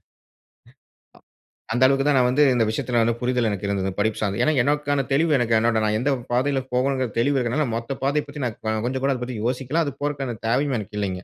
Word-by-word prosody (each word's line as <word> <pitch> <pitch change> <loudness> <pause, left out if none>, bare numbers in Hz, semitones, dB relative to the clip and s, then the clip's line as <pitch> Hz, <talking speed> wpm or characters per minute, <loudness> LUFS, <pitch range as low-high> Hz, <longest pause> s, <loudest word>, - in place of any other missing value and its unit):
அ - - -48 1.7
அந்த 125 +2 +2
அளவுக்கு 135 +1 +1
தான் 145 -2 +4
நான் 125 -1 +3
வந்து 145 +4 +3
இந்த 115 - +2
விஷயத்தில 115 +1 0
புரிதல் 125 -2 +1
எனக்கு 100 0 -3
இருந்தது 95 -1 -1
படிப்பு 110 +1 0
சார்ந்து. 100 -2 -1
ஏனா, 155 - +3
எனக்கான 145 -1 0
தெளிவு 155 +2 +3
எனக்கு 115 -2 +1
என்னோட 115 0 +1
நான் 105 0 +1
எந்த 145 +3 +1 0.2
பாதையில் 130 +1 0
போகணும்ங்குற 130 0 0
தெளிவு 140 +3 +2
இருக்கறதால 125 +3 0
மொத்த 115 +4 -5
பாதைய 145 +2 +1
பத்தி 145 -1 -6
நான் 115 -3 -4 0.3
கொஞ்சம் 130 +1 -3
கூட 140 - +2
அத 125 - -7
பத்தி 125 -3 -6
யோசிக்கல. 130 +6 0
அது 140 - -4
போறகான 135 -5 -3
தேவையும் 135 +3 +1
எனக்கு 105 0 -7
இல்லைங்க. 95 -2 -3
125 Hz, 205 wpm, -23 LUFS, 115-140 Hz, 1.7 s, தான்